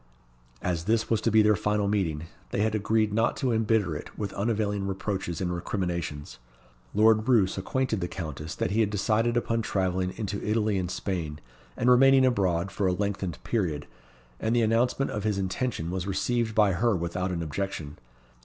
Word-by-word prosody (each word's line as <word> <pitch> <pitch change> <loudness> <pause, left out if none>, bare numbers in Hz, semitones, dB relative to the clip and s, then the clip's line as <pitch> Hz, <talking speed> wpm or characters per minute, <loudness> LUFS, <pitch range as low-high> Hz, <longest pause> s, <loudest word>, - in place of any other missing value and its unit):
As 85 -2 -1
this 110 +2 +1
was 110 -2 +2
to 115 - +2
be 110 0 +5
their 105 0 +4
final 105 0 0
meeting, 90 -7 0 0.3
they - - -1
had 110 0 +1
agreed 110 0 +1
not 115 +2 +1
to 130 -3 0
embitter 110 -6 +1
it - - -8
with 100 -2 -3
unavailing 105 -1 -1
reproaches 95 -3 -3
and 90 -2 -1
recriminations. 85 - -3 0.6
Lord 110 +1 +4
Roos 105 -7 +4
acquainted 110 +2 -1
the 90 - -1
Countess 80 -2 -6
that - - -1
he 110 - +1
had 110 -2 +3
decided 110 +3 +1
upon 115 -1 0
travelling 95 -3 -1
into 100 -2 -3
Italy 105 -2 +1
and 90 -2 -2
Spain, 85 -6 -3 0.4
and 120 - 0
remaining 135 +1 +6
abroad 95 -6 +1
for 100 - 0
a 90 - +2
lengthened 100 -2 -2
period; 85 -11 -1 0.5
and 110 +2 0
the 120 - +3
announcement 120 +5 +1
of 105 - -3
his 105 -2 0
intention 95 -2 -2
was 95 0 -3
received 115 +3 0
by 105 -3 +5
her 105 +4 +2
without 90 +2 -2
an 85 -2 -2
objection. 80 -2 -4
100 Hz, 180 wpm, -27 LUFS, 90-110 Hz, 0.6 s, remaining